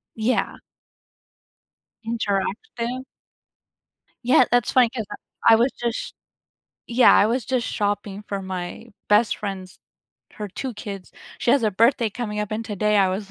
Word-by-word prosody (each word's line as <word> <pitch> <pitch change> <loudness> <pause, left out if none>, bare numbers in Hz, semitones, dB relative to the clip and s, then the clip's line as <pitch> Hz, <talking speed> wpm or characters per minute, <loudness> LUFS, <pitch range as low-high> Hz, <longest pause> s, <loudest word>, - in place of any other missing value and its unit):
Yeah. 225 +3 0 1.5
Interactive? 235 - -2 1.2
Yeah, 255 -1 +6
that's 245 -2 +2
funny 250 -3 +5
'cause 225 -4 -4
I - - -4 0.4
I - - +9
was 240 +4 +2
just 235 -1 -4 0.7
yeah. 245 +1 +6
I 205 - +5
was 240 +1 0
just 255 -1 0
shopping 205 -1 -2
for 200 -1 -4
my 185 -2 -6 0.2
best 210 +1 +4
friend's 190 -3 -6 0.5
her 210 -1 -6
2 255 +5 -5
kids. 200 -3 -8 0.3
She 240 - +2
has 280 -4 +3
a 215 - +2
birthday 230 +2 +3
coming 210 -2 -4
up 210 - -3
and 220 +1 -3
today 210 0 0
I 195 -2 +4
was 195 +1 -4
215 Hz, 145 wpm, -23 LUFS, 200-240 Hz, 1.5 s, I